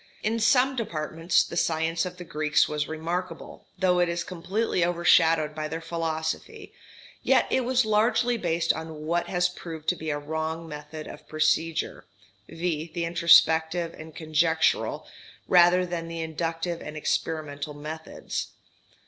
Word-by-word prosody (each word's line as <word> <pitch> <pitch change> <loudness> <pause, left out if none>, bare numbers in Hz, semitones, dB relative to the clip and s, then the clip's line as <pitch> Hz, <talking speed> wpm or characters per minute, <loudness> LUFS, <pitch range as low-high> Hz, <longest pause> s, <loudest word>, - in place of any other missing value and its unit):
In 225 +2 0
some 250 +4 +4
departments 165 -6 0
the - - -8
science 165 +1 0
of 180 0 -9
the 175 - -7
Greeks 155 -2 +1
was 150 0 -2
remarkable, 170 +3 -5
though 180 -1 +2
it 175 -1 +3
is 170 0 -2
completely 185 +2 -1
overshadowed 165 -3 +3
by 155 0 -3
their 160 +2 -4
philosophy; 165 - -4 0.5
yet - - +3
it 260 - +2
was 255 -1 +2
largely 225 +3 +2
based 170 -6 +1
on 160 -1 -7
what 170 +2 0
has 180 -1 +2
proved 165 -3 -9
to 180 - +2
be 160 -1 -5
a 145 - 0
wrong 160 +2 -4
method 150 0 -8
of - - -11
procedure, 155 +1 0 0.5
viz 165 -1 -3
the 170 -1 -1
introspective 165 0 +4
and 155 0 -11
conjectural, 160 +1 +1 0.4
rather 180 0 +5
than 170 -2 -4
the 165 0 -5
inductive 165 +1 -3
and 150 0 -7
experimental 150 -2 -2
methods. 155 +2 -5
165 Hz, 145 wpm, -26 LUFS, 160-180 Hz, 0.5 s, rather